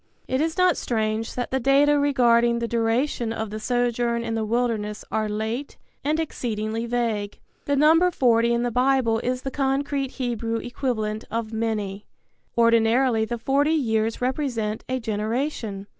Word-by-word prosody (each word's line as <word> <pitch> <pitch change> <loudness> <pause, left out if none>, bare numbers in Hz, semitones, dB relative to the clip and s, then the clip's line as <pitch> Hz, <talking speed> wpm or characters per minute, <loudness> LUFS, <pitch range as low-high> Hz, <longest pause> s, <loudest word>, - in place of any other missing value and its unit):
It 260 +2 0
is 320 +2 -1
not 365 -3 +4
strange 220 -1 -2
that 245 - -3
the 265 - +1
data 280 +3 +4
regarding 240 -4 +3
the 235 0 -2
duration 230 +1 0
of 220 -2 -4
the 215 - -4
sojourn 240 0 0
in 230 -1 -3
the 225 -1 -1
wilderness 215 -2 -1
are 215 -1 0
late 220 +6 -3 0.3
and 305 +3 0
exceedingly 225 -6 -3
vague. 225 -4 -1 0.3
The 285 - +1
number 320 +5 +5
forty 235 -7 +3
in 235 0 +1
the 245 - -1
Bible 250 -2 +2
is 250 +2 -2
the 270 - -3
concrete 275 0 -1
Hebrew 235 -3 -2
equivalent 225 -3 -3
of 225 -1 -3
many. 215 -3 -3 0.5
Ordinarily 230 0 +3
the 240 +2 -3
forty 280 +6 +1
years 225 -6 0
represent 245 -5 -2
a 260 0 -1
generation. 220 -1 -3
235 Hz, 155 wpm, -24 LUFS, 220-265 Hz, 0.5 s, number